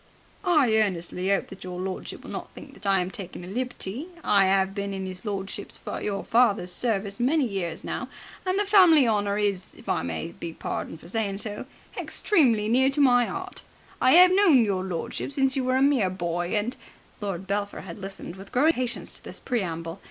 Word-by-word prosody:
"I 300 - +4
earnestly 185 -2 0
'ope 195 - +2
that 195 - -10
your 180 -1 -6
lordship 185 0 -5
will - - -9
not - - -6
think - - -11
that - - -8
I 195 -1 +4
am 180 +1 -3
taking 180 -2 -8
a - - -9
liberty. 245 - -4 0.2
I 195 -2 +4
'ave 190 0 +3
been 200 0 -4
in 190 0 -4
his 185 +2 -7
lordship 200 0 -4 0.3
your 200 -1 -2
father's 220 -6 +2
service 200 0 -2
many 275 +4 +3
years 185 -6 -4
now, - - -4 0.3
and 370 0 0
the 410 - +2
family 355 - +6
honour 205 -2 +1
is, 200 -3 -1
if - - -16
I - - +1
may 85 - -4
be 170 -1 -7
pardoned 160 - -5
for - - -12
saying 200 0 -1
so, 210 +3 -5 0.3
extremely 240 - +2
near 260 +4 +4
my 245 -4 +5
'eart. 380 -1 -6 0.4
I 260 +6 +7
'ave 365 0 +5
known 340 - +6
your 190 -3 -1
lordship 185 +8 -4
since 270 -1 +1
you 265 - 0
were 255 0 +2
a 265 - +3
mere 270 -9 +3
boy, 175 0 -2
and.. 225 +5 -1 0.2
." - - -30
Lord 195 -3 -3
Belpher 200 +1 -2
had 175 +1 -9
listened 195 -2 -7
with 195 +1 -11
growing 285 +6 +4
impatience 255 -6 -1
to - - -11
this - - -8
preamble. 170 -7 -3
205 Hz, 200 wpm, -26 LUFS, 190-255 Hz, 0.4 s, I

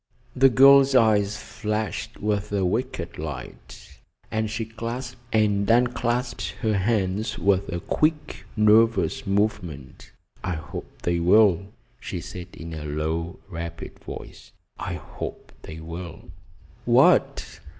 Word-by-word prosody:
The 135 +1 +6
girl's 135 +1 +7
eyes 110 -3 +4
flashed 105 0 -4
with 105 -1 -1
a 100 -2 +1
wicked 95 - -2
light, 75 -1 -8 0.3
and 110 0 -1
she 110 +1 -3
clasped 115 +2 -6
and 105 -2 +2
unclasped 120 - +1
her 110 -2 +1
hands 105 +1 0
with 100 +1 +1
a 85 - -2
quick, 155 - -1
nervous 115 +3 +3
movement. 95 -9 -2 0.3
"I 95 - -1
hope 75 -3 -9
they 85 -1 +1
will," 95 +1 +4 0.3
she - - -5
said 90 0 -8
in 85 0 -8
a 80 -1 -6
low, 80 +3 -3
rapid 85 -3 -7
voice. - - -10 0.3
"I - - -3
hope - - -8
they 80 +1 -9
will." 85 +1 -8 0.5
"What!" - - +3
105 Hz, 120 wpm, -24 LUFS, 85-115 Hz, 0.5 s, girl's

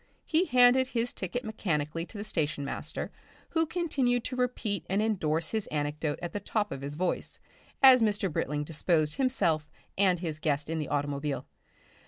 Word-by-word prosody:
He 335 +3 +2
handed 250 -1 +5
his 240 -1 0
ticket 225 +7 -4
mechanically 165 -6 -2
to 220 - -10
the 205 - -4
station 155 -7 -1
master, - - -4 0.4
who 325 -1 +1
continued 270 -9 +1
to 255 - -4
repeat 245 -5 -1
and 195 +2 +1
endorse 165 -7 0
his 220 -2 -1
anecdote 150 0 -2
at 175 - -4
the 205 - -2
top 205 +1 -1
of 135 - -5
his 140 +1 -5
voice 180 +3 -2 0.4
as 260 -2 +9
Mr. 205 -5 +1
Britling 150 +1 -1
disposed 155 0 0
himself 170 - +1 0.3
and 185 -3 +4
his 165 -3 -4
guest 150 0 0
in 165 - -1
the 150 - -3
automobile. 145 0 -2
185 Hz, 170 wpm, -29 LUFS, 150-245 Hz, 0.4 s, as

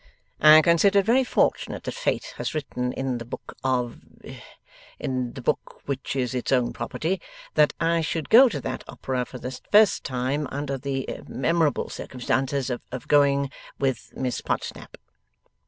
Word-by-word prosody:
I 155 +1 +8
consider 175 +4 +4
it 195 - +4
very 250 +4 +4
fortunate - - 0
that - - -4
Fate - - -2
has - - -3
written 125 -4 -2
in 130 -2 -2
the - - -5
book 120 - -9
of 125 -2 0 1.0
in 130 -2 -2
the - - -8
book - - -2
which 140 -1 -3
is 130 -2 -1
its 125 +1 -2
own 125 -3 +2
property 180 +3 -2 0.3
that 150 -1 +4
I 165 0 +2
should 160 0 -2
go 250 +3 +9
to 155 -10 -4
that - - -4
opera 130 -2 -3
for 130 - -9
the 125 +1 -5 0.2
first 210 -1 +5
time 130 +3 -1
under 140 0 -3
the 135 0 -3 0.2
memorable 160 0 +1
circumstances 130 +1 -2
of 125 0 -6
going 140 -1 +3 0.3
with 135 -2 -2
Miss 125 -2 -2
Podsnap. - - -4
140 Hz, 155 wpm, -25 LUFS, 130-160 Hz, 1.0 s, go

